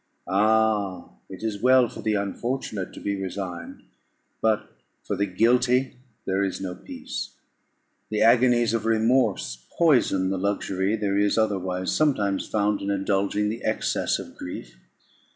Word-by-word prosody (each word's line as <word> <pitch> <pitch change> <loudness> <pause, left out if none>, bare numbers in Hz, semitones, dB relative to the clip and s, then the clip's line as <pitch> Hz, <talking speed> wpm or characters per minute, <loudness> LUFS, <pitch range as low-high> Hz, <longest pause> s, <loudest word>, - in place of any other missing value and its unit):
Ah! 105 -1 +2 0.2
it 95 +2 -9
is 105 -2 -3
well 130 0 +5
for 125 - -9
the 110 -1 0
unfortunate 105 0 -3
to - - -9
be 100 -1 -3
resigned, 90 -3 -6 0.6
but 110 -1 +1 0.3
for 100 - -2
the 100 +1 0
guilty 125 +6 +2 0.3
there 95 +1 +1
is 95 -2 -2
no 95 -1 -4
peace. 90 - -7 0.7
The 105 -1 +1
agonies 120 -1 +4
of 115 -1 -1
remorse 110 - +1
poison 120 - +3
the 95 - -1
luxury 100 0 0
there 100 -2 0
is 100 +1 +2
otherwise 95 -4 0
sometimes 105 -11 +1
found 105 -1 0
in 100 - -3
indulging 100 +1 0
the 115 +2 -5
excess - - 0
of - - -9
grief. - - -8
105 Hz, 140 wpm, -25 LUFS, 95-115 Hz, 0.7 s, well